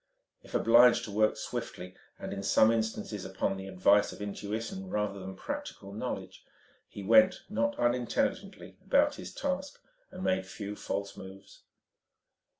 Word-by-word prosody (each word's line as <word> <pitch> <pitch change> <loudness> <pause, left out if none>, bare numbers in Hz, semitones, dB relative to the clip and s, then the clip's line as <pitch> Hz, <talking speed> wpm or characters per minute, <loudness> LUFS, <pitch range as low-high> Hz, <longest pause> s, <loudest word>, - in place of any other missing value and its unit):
If - - -10
obliged 120 +1 +6
to 110 - -6
work 110 +1 +2
swiftly 90 +1 -6 0.2
and - - -6
in 100 - -4
some 110 +2 +5
instances 110 -2 -2
upon 95 +1 -2
the 95 0 -7
advice 95 +2 +3
of - - -11
intuition 110 - -5
rather 105 - -2
than 95 0 -7
practical 100 0 -6
knowledge, 95 -5 -5 0.5
he 100 - -8
went 180 - +5
not 195 -2 0
unintelligently 120 0 -1
about - - +3
his - - -8
task, - - -3 0.3
made 95 0 -1
few 100 +1 -6
false 100 -1 -4
moves. 95 +1 -12
105 Hz, 140 wpm, -30 LUFS, 95-115 Hz, 0.5 s, obliged